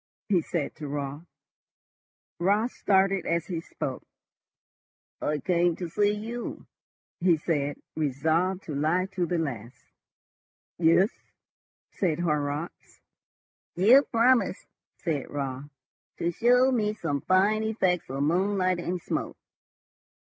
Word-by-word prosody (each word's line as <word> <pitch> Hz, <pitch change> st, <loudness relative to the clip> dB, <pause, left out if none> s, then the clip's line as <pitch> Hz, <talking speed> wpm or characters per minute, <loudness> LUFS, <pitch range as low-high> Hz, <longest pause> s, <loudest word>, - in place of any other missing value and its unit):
he 185 Hz, -4 st, +3 dB
said 160 Hz, -2 st, -3 dB
to 155 Hz, -2 st, -7 dB
Raut. 145 Hz, +3 st, -5 dB, 1.1 s
Raut 205 Hz, +7 st, +2 dB
started 195 Hz, -2 st, +2 dB
as 170 Hz, -1 st, 0 dB
he 170 Hz, -2 st, -4 dB
spoke. -, -, -5 dB, 1.2 s
"I 150 Hz, -, 0 dB
came 175 Hz, +1 st, +1 dB
to 175 Hz, -1 st, -5 dB
see 205 Hz, +4 st, +2 dB
you," 225 Hz, +3 st, -5 dB, 0.5 s
he 170 Hz, -2 st, +4 dB
said, 145 Hz, -3 st, -1 dB, 0.2 s
resolved 160 Hz, +6 st, 0 dB
to 155 Hz, -, -6 dB
lie 155 Hz, +6 st, +1 dB
to 180 Hz, -2 st, -1 dB
the 175 Hz, -, 0 dB
last. 125 Hz, -7 st, -4 dB, 1.0 s
"Yes," 175 Hz, +5 st, +4 dB, 0.8 s
said 170 Hz, -6 st, 0 dB
Horrocks. 150 Hz, -1 st, -3 dB, 0.8 s
"You 225 Hz, +10 st, +7 dB
promised," 235 Hz, -5 st, +2 dB, 0.3 s
said 155 Hz, -5 st, -3 dB
Raut, 140 Hz, 0 st, -4 dB, 0.5 s
"to 170 Hz, -, 0 dB
show 250 Hz, +7 st, +4 dB
me 215 Hz, -4 st, 0 dB
some 145 Hz, -8 st, -2 dB
fine 200 Hz, +4 st, +3 dB
effects 190 Hz, -, 0 dB
of 135 Hz, +2 st, -2 dB
moonlight 185 Hz, +2 st, +1 dB
and 175 Hz, +1 st, -2 dB
smoke." -, -, -4 dB
175 Hz, 115 wpm, -27 LUFS, 150-195 Hz, 1.2 s, You